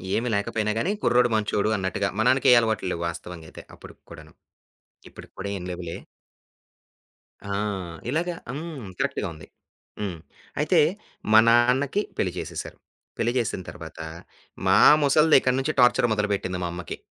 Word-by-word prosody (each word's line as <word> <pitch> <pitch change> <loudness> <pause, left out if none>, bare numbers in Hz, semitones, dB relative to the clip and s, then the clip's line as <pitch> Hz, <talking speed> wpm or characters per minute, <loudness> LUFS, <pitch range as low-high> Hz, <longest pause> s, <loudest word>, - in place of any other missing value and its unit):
ఏమి 120 - -1
లేకపోయినా 105 +1 -1
గాని 180 - 0
కుర్రోడు 125 0 +4
మంచోడు 105 0 0
అన్నట్టుగా 95 +1 -1
మనాన్నకే 125 +2 +4
అలవాట్లు 110 -4 -1
లేవు 85 - -4
వాస్తవంగా 85 -1 -9
అయితే - - -11
అప్పుడుకి - - -15
కూడాను. 80 -1 -12 0.8
ఇప్పటికి - - -13
కూడా 100 - -4
ఏం 90 - -8
లెవులే? 85 -2 -6 1.5
ఆ! - - -4 0.6
ఇలాగా 170 +4 -1 0.2
హ్మ్. 145 - -7
కరెక్ట్‌గా - - -1
ఉంది. 75 -1 -13 0.5
హ్మ్. 95 -5 -3 0.4
అయితే 160 +3 +3 0.5
మా 110 - +8
నాన్నకి 125 - +3 0.2
పెళ్లి 90 - 0
చేసేశారు. - - -6 0.4
పెళ్లి 120 +1 +1
చేసిన 110 -5 -1
తర్వాత 80 -2 -10 0.7
మా - - +5 0.3
ముసల్ది 150 +2 +5
ఇక్కడి 130 0 +1
నుంచి 150 +3 -1
టార్చర్ 125 -1 +5
మొదలుపెట్టింది 100 -3 -1
మా 90 - -1
అమ్మకి. 90 -2 -7
110 Hz, 135 wpm, -25 LUFS, 95-130 Hz, 1.5 s, మా